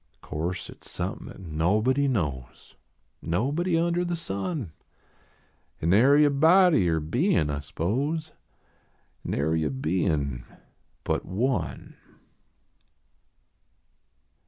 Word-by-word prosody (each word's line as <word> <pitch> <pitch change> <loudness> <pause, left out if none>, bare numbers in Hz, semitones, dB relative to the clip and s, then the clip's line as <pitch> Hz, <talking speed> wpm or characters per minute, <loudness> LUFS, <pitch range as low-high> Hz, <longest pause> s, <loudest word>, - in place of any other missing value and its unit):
O - - -16
course 85 +4 -3
at - - -14
s - - -8
somepin - - -4
at - - -11
nobody 105 - +1
knows, 75 - -3 0.5
Nobody 145 - 0
under 170 +1 +1
the 175 0 -2
sun; 135 - -4 1.1
Nary 130 - +5
a 145 - +3
body 160 - +5
or 80 -1 +1
bein 80 - +1
I 70 - -2
s 70 0 -9
pose, 145 - -2 0.9
Narv 80 +3 0
a 75 - 0
bein 70 -3 -1 0.6
but - - -1
One. 120 +8 -2
100 Hz, 105 wpm, -26 LUFS, -, 1.1 s, Nary